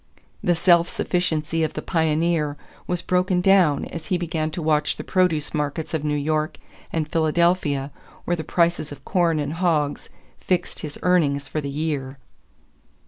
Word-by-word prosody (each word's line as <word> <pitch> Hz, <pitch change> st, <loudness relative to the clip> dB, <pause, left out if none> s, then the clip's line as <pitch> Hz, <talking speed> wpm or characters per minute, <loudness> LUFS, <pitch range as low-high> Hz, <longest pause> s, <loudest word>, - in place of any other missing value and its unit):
The 175 Hz, -, +3 dB
self 170 Hz, 0 st, +4 dB
sufficiency 165 Hz, -2 st, 0 dB
of 155 Hz, -, -1 dB
the -, -, -4 dB
pioneer 160 Hz, -2 st, +1 dB, 0.3 s
was 180 Hz, -1 st, -2 dB
broken 180 Hz, 0 st, +1 dB
down 180 Hz, -5 st, +4 dB
as 165 Hz, -, -8 dB
he 185 Hz, -, +1 dB
began 165 Hz, -2 st, -2 dB
to 160 Hz, -, -6 dB
watch 150 Hz, -1 st, +1 dB
the -, -, -5 dB
produce 175 Hz, -5 st, +1 dB
markets 150 Hz, +1 st, -2 dB
of 155 Hz, -2 st, -1 dB
New 150 Hz, -1 st, 0 dB
York 155 Hz, +1 st, -1 dB, 0.3 s
and 160 Hz, -2 st, -1 dB
Philadelphia 160 Hz, -3 st, +1 dB, 0.3 s
where 175 Hz, -, +1 dB
the 160 Hz, -, -5 dB
prices 170 Hz, -1 st, +1 dB
of 145 Hz, -, -11 dB
corn 170 Hz, -3 st, +2 dB
and 145 Hz, 0 st, -2 dB
hogs 160 Hz, -4 st, 0 dB, 0.3 s
fixed 180 Hz, -1 st, -1 dB
his 150 Hz, -2 st, -6 dB
earnings 145 Hz, -6 st, +2 dB
for 155 Hz, -, -3 dB
the 140 Hz, -, -4 dB
year. 140 Hz, -2 st, -3 dB
160 Hz, 160 wpm, -23 LUFS, 150-175 Hz, 0.3 s, self